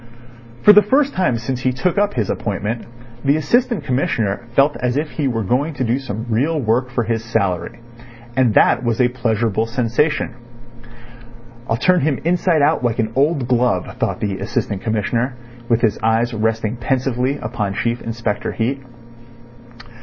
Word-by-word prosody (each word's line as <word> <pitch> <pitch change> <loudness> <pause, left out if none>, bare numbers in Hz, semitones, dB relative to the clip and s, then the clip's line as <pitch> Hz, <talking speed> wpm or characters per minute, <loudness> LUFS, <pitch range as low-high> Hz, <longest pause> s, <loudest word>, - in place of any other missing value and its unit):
For 210 - +9
the 210 - +8
first 270 +7 +2
time 130 -11 +1
since 125 +2 -3
he 130 0 +1
took 165 +10 0
up 205 0 +1
his 110 -5 0
appointment 105 +2 -3 0.4
the 140 +2 +3
Assistant 235 - +1
Commissioner 120 -4 -1
felt 140 0 +4
as 125 +1 -1
if 150 +1 -2
he 145 -3 -1
were 115 -3 -1
going 140 - 0
to 130 - -2
do 120 +2 0
some 115 -4 -5
real 140 +8 +1
work 120 +1 +1
for 120 -1 -1
his 115 0 -2
salary. 100 -1 -2 0.6
And 125 -4 +2
that - - +4
was 115 -2 0
a 125 -1 +4
pleasurable 115 -3 0
sensation. 125 +4 0 1.4
"I'll 115 - +1
turn 180 +6 +3
him 145 -2 +1
inside 170 -3 +2
out 140 - +2
like 120 -2 0
an 110 -2 -1
old 140 -1 +1
glove," 120 -7 0
thought - - -1
the 100 -2 -2
Assistant 100 0 -2
Commissioner, 115 +3 -1 0.3
with 115 -1 +2
his 110 -3 +1
eyes 115 +2 +1
resting 110 +1 -1
pensively 130 +2 0
upon 110 -5 -3
Chief 120 +3 -1
Inspector 115 -2 -3
Heat. 130 +4 -1
120 Hz, 165 wpm, -19 LUFS, 115-140 Hz, 1.4 s, For